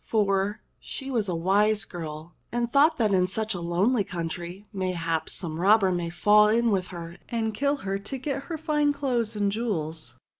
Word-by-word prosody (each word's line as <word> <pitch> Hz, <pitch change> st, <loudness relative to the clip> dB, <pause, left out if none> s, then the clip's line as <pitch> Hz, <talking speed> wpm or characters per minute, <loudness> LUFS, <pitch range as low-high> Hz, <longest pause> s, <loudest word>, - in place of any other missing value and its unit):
For 205 Hz, -1 st, 0 dB, 0.2 s
she 270 Hz, -1 st, -6 dB
was 220 Hz, -6 st, 0 dB
a 175 Hz, -, -1 dB
wise 200 Hz, +4 st, +2 dB
girl, 160 Hz, -2 st, -7 dB, 0.2 s
and 240 Hz, 0 st, -1 dB
thought 300 Hz, +3 st, +5 dB
that 215 Hz, -5 st, +2 dB
in 180 Hz, -1 st, +3 dB
such 215 Hz, +3 st, -1 dB
lonely 185 Hz, +7 st, +1 dB
coun 170 Hz, -3 st, -4 dB
try, 175 Hz, +4 st, -7 dB
mayhap, 170 Hz, -4 st, -1 dB
some 160 Hz, -3 st, -3 dB
robber 195 Hz, +1 st, +5 dB
might 175 Hz, -1 st, -2 dB
fall 210 Hz, +5 st, +6 dB
in 230 Hz, +1 st, +3 dB
with 185 Hz, -2 st, 0 dB
her 170 Hz, -1 st, -8 dB
and 225 Hz, -2 st, -1 dB
kill 280 Hz, +6 st, +1 dB
her 195 Hz, 0 st, -1 dB
to 210 Hz, +7 st, -5 dB
get 275 Hz, +1 st, -3 dB
her 330 Hz, -, -4 dB
fine 300 Hz, -2 st, +1 dB
clothes 245 Hz, -6 st, -1 dB
and 205 Hz, -1 st, +1 dB
jewels. 165 Hz, -8 st, -3 dB
205 Hz, 185 wpm, -26 LUFS, 175-235 Hz, 0.2 s, fall